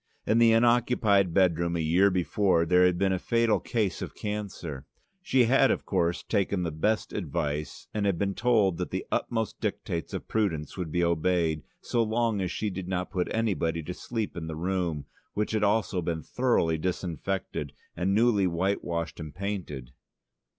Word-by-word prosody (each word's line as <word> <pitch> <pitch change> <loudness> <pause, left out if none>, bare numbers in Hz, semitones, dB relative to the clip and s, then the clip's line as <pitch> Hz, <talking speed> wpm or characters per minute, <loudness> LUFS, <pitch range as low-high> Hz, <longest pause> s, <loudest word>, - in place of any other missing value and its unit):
In 110 +2 +3
the 115 -1 +6
unoccupied 115 -5 +3
bedroom 85 -2 +2
a - - -1
year 85 +5 +4
before 90 -1 +2
there 90 +2 +5
had 90 -1 +1
been 95 +1 +2
a 95 - -1
fatal 115 +1 +2
case 110 -5 -1
of - - -6
cancer. 95 -9 -5 0.3
She 130 -9 +3
had, 135 +3 +4
of - - 0
course, 85 -3 0
taken 100 -3 0
the 85 - -2
best 105 +9 0
advice 75 0 -3
and 105 -1 0
had 95 -4 +1
been 100 +2 0
told 110 -6 +2
that - - -2
the - - -3
utmost 115 -3 -2
dictates 85 -2 -3
of - - -6
prudence 90 -9 -1
would 90 -5 -4
be 85 +1 +1
obeyed 85 -1 +1 0.2
so 120 - 0
long 115 -2 +1
as 90 - -1
she 105 +4 -2
did 95 -1 -5
not 90 -1 -2
put 90 -2 -1
anybody 90 -7 0
to 90 - -5
sleep 110 +2 -4
in 80 -2 -5
the 80 - -4
room, 85 -3 -2 0.3
which 105 +1 -1
had 110 -1 0
also 100 -3 +1
been 80 -1 -3
thoroughly 85 -11 +1
disinfected 90 +2 -3 0.2
and 95 +3 0
newly 110 -4 +4
white 95 +4 0
washed 85 -1 -3
and 80 -3 -7
painted. 90 -11 -5
95 Hz, 180 wpm, -28 LUFS, 85-105 Hz, 0.3 s, the